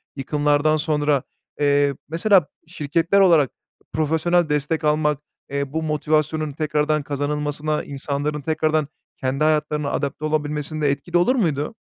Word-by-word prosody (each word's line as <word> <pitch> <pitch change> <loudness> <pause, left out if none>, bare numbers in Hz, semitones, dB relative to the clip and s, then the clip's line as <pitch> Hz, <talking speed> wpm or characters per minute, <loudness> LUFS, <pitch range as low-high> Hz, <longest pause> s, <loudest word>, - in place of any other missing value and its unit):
yıkımlardan 145 +2 +1
sonra, 150 -3 +1 0.4
eee, 145 -1 +3 0.2
mesela, 175 0 +3 0.2
şirketler 165 +3 +1
olarak 165 -8 +5 0.4
profesyonel 160 +2 +1
destek 150 +2 0
almak, 150 -1 +2 0.3
eee, 140 0 -3
bu 160 0 -1
motivasyonun 155 0 0
tekrardan 150 0 0
kazanılmasına, 150 +1 -2
insanların 145 +2 -3
tekrardan 155 0 0 0.3
kendi 135 +3 -1
hayatlarına 150 -1 +1
adapte 145 +1 -2
olabilmesinde 150 0 -1
etkili 140 +5 -1
olur 210 +10 +3
muydu? 160 - 0
150 Hz, 115 wpm, -22 LUFS, 145-155 Hz, 0.4 s, olarak